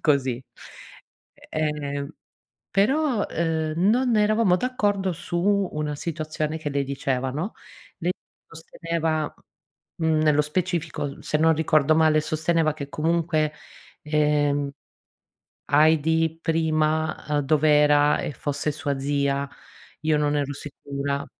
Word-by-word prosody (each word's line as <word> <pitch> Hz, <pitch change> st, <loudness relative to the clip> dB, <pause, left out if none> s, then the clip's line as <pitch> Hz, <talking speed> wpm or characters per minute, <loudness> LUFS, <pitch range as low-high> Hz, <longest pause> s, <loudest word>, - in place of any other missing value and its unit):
così. 135 Hz, -5 st, +1 dB, 1.1 s
Ehm, 145 Hz, -2 st, -2 dB, 0.6 s
però, 245 Hz, +3 st, +2 dB
uhm, 160 Hz, -1 st, -1 dB
non 230 Hz, +6 st, +3 dB
eravamo 210 Hz, -3 st, +3 dB
d'accordo 205 Hz, -5 st, 0 dB
su 190 Hz, +4 st, 0 dB
una 150 Hz, -1 st, -2 dB
situazione 155 Hz, -1 st, -3 dB
che 150 Hz, -, -4 dB
lei 140 Hz, 0 st, 0 dB
diceva, 135 Hz, -1 st, -2 dB
no, 160 Hz, -, -3 dB, 0.5 s
lei 180 Hz, +1 st, 0 dB, 0.3 s
sosteneva, 165 Hz, -1 st, -3 dB, 0.7 s
mhmm, 160 Hz, -1 st, +2 dB
nello 150 Hz, -1 st, +4 dB
specifico 165 Hz, -3 st, -3 dB
se 150 Hz, -, 0 dB
non 160 Hz, +1 st, +5 dB
ricordo 155 Hz, -1 st, +3 dB
male, 155 Hz, -1 st, +4 dB
sosteneva 155 Hz, +1 st, +1 dB
che 140 Hz, -3 st, -7 dB
comunque, 155 Hz, 0 st, 0 dB, 0.5 s
ehm, 150 Hz, -2 st, +1 dB, 1.0 s
Heidi 160 Hz, +2 st, +3 dB
prima, 160 Hz, -1 st, 0 dB
uhm, 150 Hz, -1 st, +2 dB
dov'era 150 Hz, 0 st, +4 dB
e -, -, -3 dB
fosse 145 Hz, +3 st, -2 dB
sua 145 Hz, -2 st, -2 dB
zia, 140 Hz, 0 st, 0 dB, 0.5 s
io 155 Hz, -1 st, +2 dB
non 150 Hz, 0 st, +1 dB
ero 145 Hz, -1 st, -1 dB
sicura 140 Hz, 0 st, -4 dB
155 Hz, 110 wpm, -24 LUFS, 145-165 Hz, 1.1 s, non